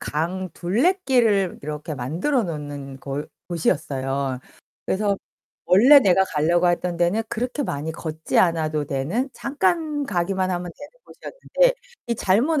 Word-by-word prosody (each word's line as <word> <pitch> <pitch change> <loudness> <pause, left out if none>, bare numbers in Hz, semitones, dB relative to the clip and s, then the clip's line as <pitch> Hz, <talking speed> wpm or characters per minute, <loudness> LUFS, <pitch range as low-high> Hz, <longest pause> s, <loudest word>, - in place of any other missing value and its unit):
강 180 +5 -2
둘레길을 230 - +1
이렇게 150 +1 -5
만들어 170 - 0
놓는 145 -5 -6
골 140 +2 -5 0.2
곳이었어요. 135 -5 -1 0.4
그래서 200 0 0 0.5
원래 255 +10 +7
내가 190 -3 +4
가려고 170 +2 +2
했던 175 0 0
데는 175 +6 +1
그렇게 250 +5 -2
많이 155 - -3
걷지 160 0 -4
않아도 155 -4 +2
되는 160 - -2
잠깐 295 +1 -1
가기만 185 -2 -1
하면 175 -1 -3
되는 290 - -11
곳이었는데, - - 0 0.4
이 235 - +1
잘못 265 - +2
180 Hz, 295 characters per minute, -23 LUFS, 150-240 Hz, 0.5 s, 원래